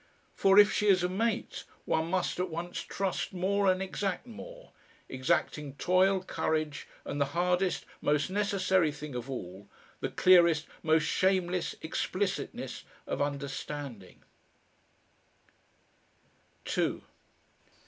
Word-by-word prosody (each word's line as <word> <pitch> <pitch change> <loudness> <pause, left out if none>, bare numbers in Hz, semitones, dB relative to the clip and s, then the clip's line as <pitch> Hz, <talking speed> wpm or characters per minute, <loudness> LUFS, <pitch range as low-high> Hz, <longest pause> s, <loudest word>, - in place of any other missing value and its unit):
For 195 0 +4
if 205 0 +8
she 210 - +1
is 185 -3 +5
a - - +3
mate, 225 +5 -2 0.2
one 160 +1 0
must 185 0 -1
at 185 0 0
once 170 +2 -4
trust 195 -1 -3
more 195 +2 +2
and 185 +1 -1
exact 190 +1 -3
more, - - -11 0.4
exacting 145 0 -1
toil, 185 +4 +3
courage, 155 -5 -2 0.2
and 145 - -3
the - - +4
hardest, 180 +1 +1 0.2
most 150 +4 +1
necessary 190 -4 +2
thing 150 -1 -8
of 125 +1 -5
all, 100 -5 -7 0.3
the - - -2
clearest, 170 -4 +5 0.2
most 160 -1 +3
shameless, 180 0 +1
explicitness 185 +4 -3 0.2
of - - -3
understanding.... 140 -6 -5
180 Hz, 110 wpm, -30 LUFS, 150-190 Hz, 0.4 s, if